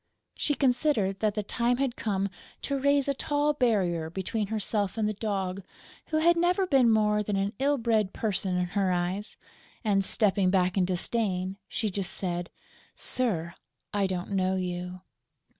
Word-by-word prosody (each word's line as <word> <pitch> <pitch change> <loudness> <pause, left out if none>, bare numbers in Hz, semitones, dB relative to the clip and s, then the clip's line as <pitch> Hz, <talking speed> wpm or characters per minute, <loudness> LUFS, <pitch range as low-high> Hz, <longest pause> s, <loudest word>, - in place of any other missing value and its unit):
She 290 - 0
considered 250 -8 +1
that 215 -1 +1
the 210 - -1
time 240 +4 0
had 265 -2 0
come 200 -2 -1 0.3
to 280 -1 -1
raise 280 0 +3
a 280 - +2
tall 290 +2 +1
barrier 190 - +1
between 195 +4 -2
herself 210 -1 -1
and 215 -1 +1
the 215 - -1
Dog, 195 -3 -2 0.5
who 310 - 0
had 340 +2 +5
never 355 +3 +2
been 270 -8 +4
more 210 -1 +3
than 210 -1 -2
an 195 +2 0
ill 285 +2 +2
bred 220 -5 +1
person 195 -4 -1
in 180 - +1
her 195 -1 +1
eyes; 180 +4 -2 0.5
and, 200 -3 +2
stepping 195 -2 +2
back 185 -1 +2
in 190 -2 +3
disdain, 185 0 -1
she 215 -3 -2
just 190 -1 -3
said: 175 -2 -3 0.5
"Sir, 175 -10 0 0.4
I 200 -1 +2
don't 185 +1 -4
know 190 -1 +1
you." 180 0 -4
205 Hz, 165 wpm, -28 LUFS, 185-240 Hz, 0.5 s, had